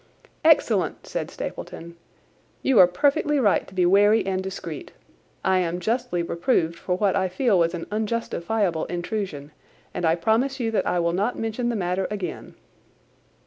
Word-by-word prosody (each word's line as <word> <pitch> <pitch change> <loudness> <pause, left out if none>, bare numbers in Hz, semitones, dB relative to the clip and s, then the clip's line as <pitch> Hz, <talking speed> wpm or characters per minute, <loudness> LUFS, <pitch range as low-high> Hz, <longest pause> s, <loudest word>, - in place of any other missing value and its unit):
"Excellent!" - - +3
said - - -4
Stapleton. 170 +1 -7 0.7
"You 265 -5 +4
are 180 - +9
perfectly 290 - +1
right 210 -6 +2
to 190 - -14
be 180 -1 +3
wary 205 +4 +4
and 190 -1 -1
discreet. 185 -5 -7 0.5
I 190 -1 +3
am 175 0 -1
justly 225 -4 -1
reproved 170 -1 0
for 180 - -1
what 195 -1 +1
I 190 -1 +1
feel 200 +1 +2
was 170 +1 +2
an 170 - -5
unjustifiable 210 -5 -1
intrusion, 175 -4 -4 0.4
and - - -4
I 165 0 +3
promise 230 +10 +1
you 230 -2 -1
that 220 - 0
I 180 - +1
will 170 0 +1
not 205 +7 0
mention 225 +2 -2
the 235 - -1
matter 185 -1 -1
again." 195 -5 -6
190 Hz, 160 wpm, -24 LUFS, 175-225 Hz, 0.7 s, are